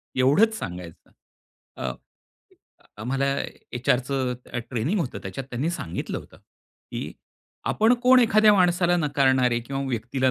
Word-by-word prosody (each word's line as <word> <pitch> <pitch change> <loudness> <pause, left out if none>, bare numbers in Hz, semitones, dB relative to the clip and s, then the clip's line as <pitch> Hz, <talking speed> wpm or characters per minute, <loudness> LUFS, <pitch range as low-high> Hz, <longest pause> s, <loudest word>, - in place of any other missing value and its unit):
एवढंच 145 - +4
सांगायचं. 90 -2 -8 0.7
अ, 65 -1 -2 1.1
आम्हाला 135 +3 0 0.5
एचआरचं 125 +1 0 0.2
अ, - - -2
ट्रेनिंग 135 - 0
होतं 135 -7 -3
त्याच्यात 95 +7 -6
त्यांनी 135 +7 -1
सांगितलं 170 - -4
होतं, - - -15
की - - -10 0.6
आपण 225 +3 +4
कोण 255 0 +7
एखाद्या 215 -2 +5
माणसाला 175 -1 +3
नाकारणारे 130 -5 +2
किंवा 135 +3 -4
व्यक्तीला 130 +2 0
135 Hz, 115 wpm, -25 LUFS, 125-175 Hz, 1.1 s, कोण